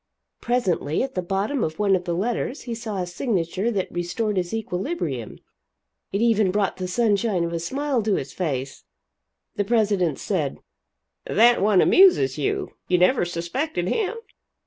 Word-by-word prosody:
Presently, 190 Hz, -, 0 dB
at 265 Hz, 0 st, -4 dB
the 185 Hz, -, -1 dB
bottom 200 Hz, +8 st, -1 dB
of 155 Hz, 0 st, -3 dB
one 200 Hz, -2 st, +3 dB
of 180 Hz, -1 st, -3 dB
the 170 Hz, -, -1 dB
letters 240 Hz, -, -2 dB
he 240 Hz, -, -4 dB
saw 225 Hz, -3 st, -5 dB
a -, -, -3 dB
signature 185 Hz, +1 st, -1 dB
that 200 Hz, -5 st, -2 dB
restored 200 Hz, +5 st, -2 dB
his 180 Hz, -2 st, -1 dB
equilibrium; 180 Hz, -, -3 dB, 0.7 s
it 200 Hz, -, -1 dB
even 220 Hz, -4 st, +3 dB
brought 200 Hz, +1 st, 0 dB
the 185 Hz, -, -3 dB
sunshine 205 Hz, -2 st, +1 dB
of 170 Hz, 0 st, -3 dB
a 170 Hz, -, -1 dB
smile 270 Hz, -, -1 dB
to 210 Hz, -2 st, +1 dB
his 135 Hz, -, -4 dB
face. 135 Hz, -7 st, -3 dB, 0.7 s
The 205 Hz, -, +2 dB
president 200 Hz, -, +1 dB
said: -, -, -2 dB, 0.7 s
"That 235 Hz, +3 st, +4 dB
one 200 Hz, -2 st, +4 dB
amuses 155 Hz, -, +5 dB
you. 140 Hz, -, -2 dB
You 180 Hz, -, +3 dB
never 180 Hz, +4 st, +3 dB
suspected 175 Hz, -, -2 dB
him?" 435 Hz, 0 st, 0 dB
195 Hz, 160 wpm, -24 LUFS, 175-235 Hz, 0.7 s, amuses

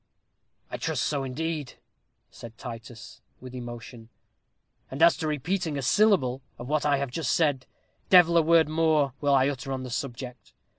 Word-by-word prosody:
"I -, -, -4 dB
trust -, -, -2 dB
so, 145 Hz, -2 st, -1 dB
indeed," 150 Hz, +1 st, -4 dB, 0.6 s
said 115 Hz, -1 st, -12 dB
Titus, 115 Hz, -1 st, -10 dB, 0.2 s
with 130 Hz, 0 st, -11 dB
emotion; 120 Hz, -2 st, -9 dB, 0.8 s
"and 135 Hz, -, -7 dB
as 170 Hz, -, +7 dB
to 160 Hz, -, -3 dB
repeating 155 Hz, +1 st, -2 dB
a 140 Hz, -, -3 dB
syllable 140 Hz, -, +3 dB, 0.2 s
of 120 Hz, -, -8 dB
what 150 Hz, +1 st, 0 dB
I 145 Hz, -1 st, +3 dB
have 140 Hz, -2 st, -3 dB
just 135 Hz, -3 st, -2 dB
said, 145 Hz, -5 st, +1 dB, 0.4 s
devil 175 Hz, -2 st, +6 dB
a 170 Hz, -, +6 dB
word 165 Hz, -1 st, +4 dB
more 155 Hz, -3 st, +1 dB
will 140 Hz, -1 st, +3 dB
I 135 Hz, 0 st, +4 dB
utter 135 Hz, -1 st, -4 dB
on 130 Hz, -1 st, -3 dB
the 125 Hz, -, -7 dB
subject. 125 Hz, 0 st, -6 dB
140 Hz, 165 wpm, -26 LUFS, 125-160 Hz, 0.8 s, as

